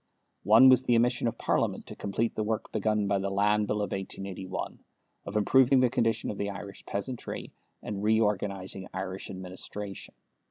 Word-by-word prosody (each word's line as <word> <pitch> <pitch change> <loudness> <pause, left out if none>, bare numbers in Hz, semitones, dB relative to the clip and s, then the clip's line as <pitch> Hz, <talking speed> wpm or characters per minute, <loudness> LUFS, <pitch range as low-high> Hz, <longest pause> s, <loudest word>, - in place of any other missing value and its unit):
One 110 +6 +8
was 130 -1 +7
the 120 -2 +2
omission 120 +1 +2
of 115 0 -3
Parliament - - 0
to - - -9
complete 110 +3 -1
the - - -2
work 110 0 -2
begun 105 -1 +1
by 100 -1 +1
the 100 0 -2
Land 105 +2 +2
Bill 105 0 0
of 100 - -4
1881, 95 -1 -5 0.5
of - - -6
improving 130 +5 +5
the 125 -2 +3
condition 115 -3 +1
of 100 - -8
the 100 - -1
Irish 100 0 -8
peasantry 115 +5 -5 0.3
and 100 -2 -4
reorganizing 100 -3 0
Irish 95 0 -5
administration. 95 +2 -6
105 Hz, 165 wpm, -29 LUFS, 95-115 Hz, 0.5 s, One